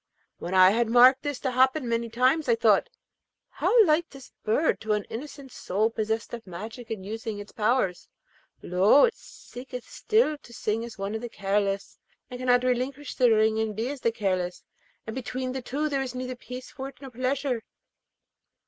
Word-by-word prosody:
When 175 +2 -4
I 185 0 +8
had 230 +1 +1
marked 250 +3 +7
this 290 -3 -3
to 260 - -1
happen 260 +2 +2
many 230 0 -1
times, 255 +5 +2
I 235 - +5
thought, 225 - +3 0.6
'How 460 -3 +4
like 320 +1 +2
is 270 -2 -12
this - - -42
bird 285 +9 +1
to 220 -1 0
an 210 -1 0
innocent 275 +2 -8
soul 215 +5 -1
possessed 220 +1 -2
of 235 -3 -7
magic 220 +7 -8
and 205 -4 -5
using 220 0 -5
its 205 0 -9
powers! 215 -5 0 0.5
Lo, 190 +10 +5
it 470 - -1
seeketh 250 0 -10
still 430 -10 +1
to 235 - -16
sing 220 0 -2
as 235 -1 -9
one 195 +1 -3
of 220 - -3
the 240 - -5
careless, 200 -1 -1 0.3
and 250 - -6
cannot 250 -1 +3
relinquish 255 +3 -1
the 250 -1 +4
ring 220 0 +3
and 220 -1 -1
be 225 +4 -2
as 285 -2 -6
the 230 - +2
careless, 185 -4 -2 0.4
and 220 - -6
between 255 0 -4
the 260 0 -4
two 285 +5 -2
there 280 -2 -1
is 255 -2 -5
neither 255 0 -4
peace 250 +1 -9
for 265 -1 -6
it - - -18
nor 270 -2 -10
pleasure.' 255 0 -1
240 Hz, 195 wpm, -26 LUFS, 220-260 Hz, 0.6 s, I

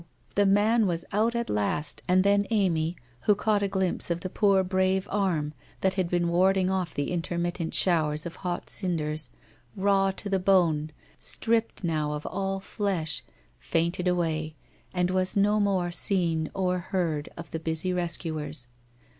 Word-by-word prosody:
The 205 0 +3
man 210 +3 +4
was 170 -2 -2
out 220 +4 +1
at 235 0 -1
last, 125 +8 -1
and 185 +1 +4
then 200 0 +3
Amy, 175 -6 +1 0.3
who 210 - +6
caught 210 0 +1
a 200 - +1
glimpse 190 -3 0
of 170 0 -1
the 185 - -5
poor 195 -2 +3
brave 190 +1 +1
arm 175 -7 0 0.3
that 190 0 +2
had 185 -3 -1
been 175 -1 +1
warding 185 +2 +3
oft' 185 -5 -2
the 145 +3 -2
intermittent 175 -1 -2
shower 160 -5 +3
of 170 - -7
hot 180 -2 -4
cinders, 155 -6 -2 0.5
raw 195 0 +3
to 195 +2 -4
the 195 -1 +1
bone, 170 -5 +3 0.3
stripped 225 -2 -1
now 155 -3 0
of 150 0 -5
all 195 0 -2
flesh, 190 -5 -2 0.4
fainted 170 +2 0
away, 160 -3 0 0.4
and 180 0 0
was 185 +1 +1
no 205 +1 +3
more 190 -4 +1
seen 170 -4 +2
or 180 -1 0
heard 170 -5 -2
of 170 0 -9
the 160 - -3
busy 160 +3 -1
rescuers. 160 -7 -2
180 Hz, 160 wpm, -27 LUFS, 165-195 Hz, 0.5 s, who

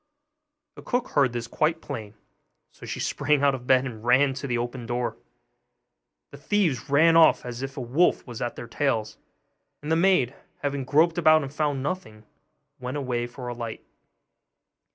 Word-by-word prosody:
The - - -9
cook 245 0 -2
heard 140 -4 +2
this 120 -1 -4
quite 160 +7 0
plain, 105 -7 -7 0.6
so - - -12
she - - -4
sprang 145 0 +1
out 140 -1 +4
of 125 -2 -7
bed, 130 0 +4
and 115 -4 -7
ran 130 +3 +4
to 130 -2 -3
open 120 +2 -4
the 115 - -9
door. 120 0 -2 1.2
The - - -11
thieves 165 - 0
ran 160 +4 +5
off 165 -5 +5
as 120 0 -6
if 135 0 -6
a - - -3
wolf 135 +9 +1
was 120 -3 -8
at 120 - -3
their 120 - -7
tails: 110 -7 -1 0.6
and 150 +2 -5
the - - +4
maid, 165 -8 +3 0.3
having 140 -2 -2
groped 165 +5 +3
about 155 -2 +5
and 135 0 -7
found 145 -3 -1
nothing, 140 - -5 0.6
went 125 +3 -4
away 125 -4 -2
for 125 +1 -9
a 120 - -3
light. 115 -2 -6
135 Hz, 175 wpm, -25 LUFS, 120-150 Hz, 1.2 s, ran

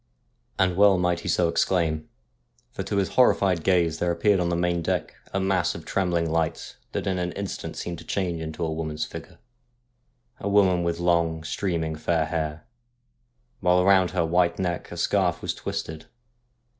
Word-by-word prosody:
' - - -44
And 95 -2 +2
well 100 -1 +6
might 90 -1 +1
he 85 - -8
so 85 +1 +2
exclaim, 85 -2 0 0.6
for - - -5
to 100 - -2
his 100 -1 +1
horrified 100 -7 +3
gaze 85 -4 +2
there 90 - +1
appeared 95 +4 +2
on 85 -1 0
the 85 - 0
main 85 0 0
deck - - -2 0.2
a 95 - -1
mass 95 -2 +1
of - - -9
trembling 85 -3 0
light 80 0 -2 0.2
that - - -2
in 95 -2 0
an 90 0 -2
instant 100 -1 -5
seemed 85 -1 -5
to - - -10
change 85 -3 -2
into 80 +1 -4
a 80 - -2
woman's 80 -1 -3
figure, - - -10 1.0
a 100 - -3
woman 95 -3 +4
with 85 0 -1
long, 85 -2 +1
streaming 80 -2 -2
fair 80 0 0
hair, 80 -1 -3 0.9
while 90 0 +3
round 95 -2 +5
her 90 -3 0
white 85 +1 +2
neck 90 -3 -3
a - - -7
scarf - - +1
was - - -2
twisted. 80 0 -5
85 Hz, 180 wpm, -25 LUFS, 80-95 Hz, 1.0 s, well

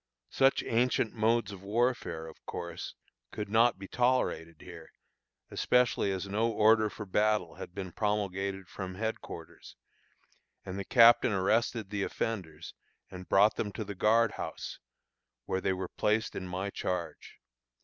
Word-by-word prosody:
Such 135 0 +3
ancient 120 -1 +1
modes 115 -1 +1
of 100 -2 -9
warfare, 100 -6 -1
of 80 - -13
course, 85 -1 -6 0.4
could 105 -1 -5
not 115 +1 +4
be 95 0 -9
tolerated 120 -11 0
here, - - -11 0.6
especially 125 -5 +2
as 95 +1 -3
no 110 +4 +1
order 110 0 +4
for 105 - -8
battle 105 -3 +1
had 90 - -9
been 95 -3 -5
promulgated 100 -2 -2
from 95 0 -6
headquarters, 110 +3 -6 0.9
and 95 +1 -5
the - - -3
captain 115 -2 +6
arrested 110 +2 +1
the 105 -1 -2
offenders 90 -7 -4 0.4
and 90 -1 -9
brought 105 +2 +5
them 105 - -2
to 110 - -4
the 100 0 -6
guard 110 +3 +3
house, - - -6 0.7
where 95 - -1
they 95 - +1
were 95 0 -3
placed 110 +4 0
in 95 - -5
my 95 +2 -3
charge. 90 -4 -4
100 Hz, 145 wpm, -30 LUFS, 95-115 Hz, 0.9 s, captain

